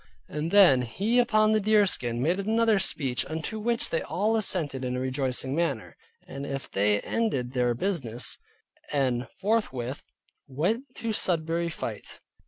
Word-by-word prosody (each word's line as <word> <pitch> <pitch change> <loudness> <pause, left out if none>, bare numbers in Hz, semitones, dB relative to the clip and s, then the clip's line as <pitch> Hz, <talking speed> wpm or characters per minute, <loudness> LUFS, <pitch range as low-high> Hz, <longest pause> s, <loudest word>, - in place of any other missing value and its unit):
And 150 +2 -3
then 175 -10 +6
he 200 - 0
upon 215 -3 +3
the 215 - +3
deerskin, 195 - +1
made 175 +6 +1
another 220 +1 +2
speech 135 -9 0
unto 160 +8 -3
which 235 +2 -1
they 165 - +1
all 215 +4 0
assented 160 -11 -1
in 125 0 -2
a - - -2
rejoicing 130 0 -2
manner. 145 -7 -2 0.3
And 140 - -7 0.2
so - - -13
they 105 +1 +2
ended 135 - -1
their 125 -2 +1
business, 125 - -2 0.5
and 130 -4 0
forthwith 160 - -1 0.4
went 180 - -1
to 230 -1 -2
Sudbury 170 -3 +1
fight. 165 - -6
165 Hz, 145 wpm, -27 LUFS, 130-210 Hz, 0.5 s, then